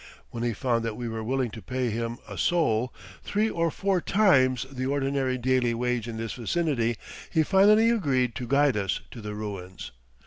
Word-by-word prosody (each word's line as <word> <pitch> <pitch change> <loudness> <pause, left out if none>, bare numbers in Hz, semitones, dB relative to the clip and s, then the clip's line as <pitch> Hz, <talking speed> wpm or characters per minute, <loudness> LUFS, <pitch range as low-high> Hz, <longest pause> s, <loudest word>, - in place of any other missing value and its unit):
When 115 - -5
he 120 -1 0
found 115 +1 0
that 115 -2 -3
we 120 - -4
were 110 -1 -4
willing 130 0 -1
to 110 - -9
pay 125 0 -2
him 115 +1 -3
a - - -7
sol, 125 -9 +1 0.3
three 215 +2 0
or 165 0 +1
four 190 +2 0
times 130 - +3
the 130 -1 -3
ordinary 135 -2 0
daily 125 -1 +1
wage 120 -1 -1
in 115 -1 -5
this 115 0 -4
vicinity, 120 -3 0 0.3
he 160 -2 +2
finally 210 +6 +5
agreed 130 - +1
to 125 - -5
guide 140 0 +3
us 95 -2 -1
to 120 - -9
the 105 0 -5
ruins. 100 -6 -6
125 Hz, 185 wpm, -27 LUFS, 115-145 Hz, 0.3 s, finally